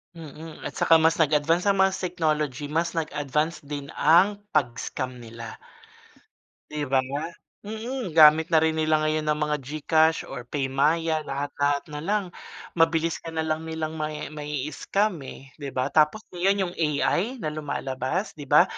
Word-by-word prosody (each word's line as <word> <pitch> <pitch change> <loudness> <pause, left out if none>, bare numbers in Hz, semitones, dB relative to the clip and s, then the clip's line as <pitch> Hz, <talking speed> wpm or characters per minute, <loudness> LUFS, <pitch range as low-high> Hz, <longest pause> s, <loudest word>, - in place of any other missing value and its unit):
Mm, 160 0 -10
at - - -6
saka 165 -1 +5
mas 160 +1 +3
nag-advanced 160 +3 +2
ang 195 -1 +3
mga 190 0 +3
technology 155 -6 -1
mas 165 +2 0
nag-advanced 150 -1 -2
din 145 -1 -6
ang 180 +6 +5 0.2
pag-scam 125 -1 -1
nila, 115 -1 -9 1.2
'di 150 -2 -3
ba? 130 0 +2 0.6
Mm, 220 -2 -5
gamit 155 +1 +7
na 165 - +3
rin 160 0 +3
nila 155 0 +2
ngayon 155 0 0
ang 150 - +2
mga 150 0 0
GCash 155 +3 +1
or 125 0 -8
PayMaya 150 +4 +1
lahat-lahat 145 +1 -1
na 150 - -4
lang, 200 +5 0 0.5
mabilis 165 0 +2
ka - - -9
na 160 -1 -2
lang 160 +1 -2
nilang 160 -1 -4
mai 155 0 -4
mai-scam, 150 +8 -1 0.2
eh, 135 0 -11
'di 140 - -5
ba. 130 +2 0
Tapos 155 +8 +3
ngayon 190 0 +1
'yong - - -14
AI 155 - +1
na 155 -11 -4
lumalabas 145 - -3
'di 145 -3 -10
ba, 150 +5 +7
155 Hz, 155 wpm, -25 LUFS, 145-165 Hz, 1.2 s, gamit